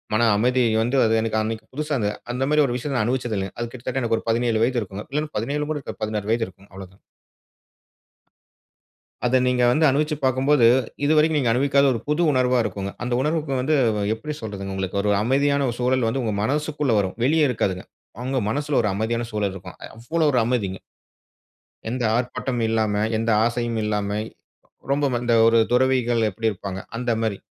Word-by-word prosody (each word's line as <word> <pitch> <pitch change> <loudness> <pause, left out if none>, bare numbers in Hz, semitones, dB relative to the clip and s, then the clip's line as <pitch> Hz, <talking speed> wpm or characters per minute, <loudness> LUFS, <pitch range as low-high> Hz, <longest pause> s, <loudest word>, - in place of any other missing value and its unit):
மன 115 0 +3
அமைதி 125 +3 +2 0.2
வந்து 120 +4 0
அது 110 - +2
எனக்கு 110 -1 -1
அன்னைக்கு 110 0 -4
புதுசா 150 0 -2
இந்த. 105 - 0 0.2
அந்த 130 +2 -1
மாரி 150 0 +4
ஒரு 120 - -2
விஷயத்த 135 +2 -3
நான் 110 - +1
அனுபவிச்சது 120 -3 -1
இல்லங்க. 95 -1 -4
அது 120 - -3
கிட்டத்தட்ட 130 +2 -4
எனக்கு 115 -1 +1
ஒரு - - -15
17 115 -1 +1
வயது 125 0 +1
இருக்கும் 100 +1 -7
இல்ல 150 +1 0
17 145 +7 -2
கூட 150 - -2
இருக்காது - - -9
16 105 -1 -3
வயது 115 -1 +1
இருக்கும். 95 +2 -20
அவ்வளோதான். 95 0 -12 2.2
அத 125 +1 +3
நீங்க 125 -1 +2
வந்து 155 +5 +2
அனுபவிச்சு 150 +3 +1
பார்க்கும்போது 130 0 +3 0.4
இதுவரைக்கும் 155 +1 +3
நீங்க 125 -5 +1
அனுபவிக்காத 140 +3 +3
ஒரு 115 - -3
புது 150 +3 +1
உணர்வா 130 -1 +2
இருக்குங்க. 100 -1 -4
அந்த 120 0 -3
உணர்வுக்கு 150 0 -1
வந்து 145 +5 +1 0.4
எப்டி 150 +7 -6
சொல்றது? 100 -2 -5
உங்களுக்கு 95 +1 -2
ஒரு 105 - +1
அமைதியான 140 +3 +2
சூழல் 125 -1 +1
வந்து 130 +3 -1
உங்க 110 -2 -1
மனசக்குள்ள 150 +1 0
வரும் 95 -2 -1
வெளியே 155 +3 +3
இருக்காதுங்க. 95 -6 -2 0.4
அவங்க 130 +2 -1
மனசுல 145 +3 0
ஒரு 105 - +1
அமைதியான 115 +3 -1
சூழல் 105 -2 -1
இருக்கும். 95 -1 -10 0.2
அவ்வளோ 155 +8 -1
ஒரு 125 - +2
அமைதிங்க. 105 -6 -1 1.1
எந்த 125 +2 -2
ஆர்ப்பாட்டமும் 120 0 -2
இல்லாம, 110 -2 +1 0.2
எந்த 115 0 0
ஆசையும் 120 -1 -1
இல்லாம, 105 -1 -1 0.8
ரொம்ப 145 +1 +2 0.2
இந்த 120 -1 +2
ஒரு 115 0 +5
துறவிகள் 125 -3 +2
எப்டி 110 +3 -1
இருப்பாங்க? 95 -1 -6 0.2
அந்த 120 0 -1
மாரி. 110 -3 -1
120 Hz, 175 wpm, -23 LUFS, 110-135 Hz, 2.2 s, ஒரு